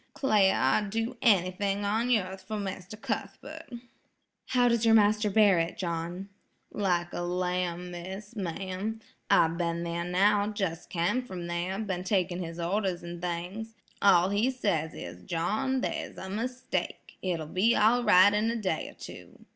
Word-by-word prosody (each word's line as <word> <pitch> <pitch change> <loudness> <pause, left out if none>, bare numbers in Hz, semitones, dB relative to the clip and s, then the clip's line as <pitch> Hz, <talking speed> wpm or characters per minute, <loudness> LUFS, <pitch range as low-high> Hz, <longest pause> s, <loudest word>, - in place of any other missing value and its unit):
'Clare, 210 -8 +3
I'd 195 +11 +2
do 225 +4 -2
anyting 195 -1 +2
on 220 +4 0
yearth 190 -5 0
for 215 - -3
Mr. 195 0 -5
Cuthbert." - - -5 0.8
"How 245 -1 +3
does 235 -1 +2
your 225 -1 +6
master 210 0 +4
bear 200 -3 +5
it, 165 +1 -2
John?" 175 +2 -4 0.4
"Like 175 -4 0
a - - -3
lamb, 180 0 -2
miss–ma'am–I've 190 -1 -2
been 170 0 -1
there 170 0 -2
now, 200 +4 +2
jes' 175 -4 -2
cam 180 +8 0
from 185 -8 -7
there, 175 +2 -2
been 190 -4 -3
taking 185 -2 0
his 165 0 -6
orders 185 +1 -1
an' 170 0 -7
things. 180 +6 -4 0.3
All 185 -2 +5
he 210 +5 +2
says 180 - -1
is 90 +1 -8
'John, 215 - -1
there's - - -4
a 190 - -7
mistake; 250 +5 -4
it'll 170 -4 -2
be 190 +9 +2
all 235 +4 +4
right 190 -1 +6
in 210 +2 +1
a 230 - -1
day 190 -8 -2
or - - -15
two. - - -12
190 Hz, 155 wpm, -29 LUFS, 175-215 Hz, 0.8 s, your